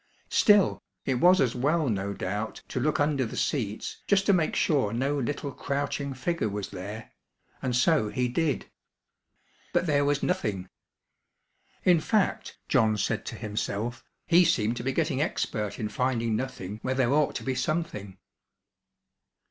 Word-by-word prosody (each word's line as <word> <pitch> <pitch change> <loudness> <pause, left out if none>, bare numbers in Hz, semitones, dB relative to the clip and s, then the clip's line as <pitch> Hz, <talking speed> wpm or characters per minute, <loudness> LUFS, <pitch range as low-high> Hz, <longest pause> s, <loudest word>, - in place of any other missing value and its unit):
Still, 205 -2 +4 0.2
it 130 -2 0
was 180 +4 +6
as 125 -3 +2
well 150 +5 +1
no 100 -3 -1
doubt 105 +3 -4
to - - -2
look 150 +4 +1
under 145 -2 +2
the 110 - -5
seats 110 -7 -2
just 195 -1 +3
to 200 - +5
make 170 -4 +1
sure 135 -10 +2
no 135 +4 0
little 140 +2 -3
crouching 140 0 -3
figure 130 -1 -1
was 100 -1 -4
there, 105 +5 -7 0.5
and 125 -2 -1
so 130 -3 +3
he 125 +2 0
did. 150 +4 -1 1.1
But - - +2
there 145 -3 +2
was 145 0 +1
nothing. 100 - -1 1.1
In 175 -2 +5
fact, 200 +5 0
John 110 -6 +3
said - - -1
to - - -4
himself, 110 +2 -3 0.2
he 175 +2 +6
seemed 115 -7 +2
to 120 - -4
be 135 - 0
getting 145 -1 0
expert 105 -8 -2
in 110 - -2
finding 115 0 0
nothing 105 -5 -4
where 130 0 -1
there 130 0 +2
ought 150 -1 +2
to - - -4
be 130 - -1
something. 125 - -3
130 Hz, 155 wpm, -27 LUFS, 110-150 Hz, 1.1 s, was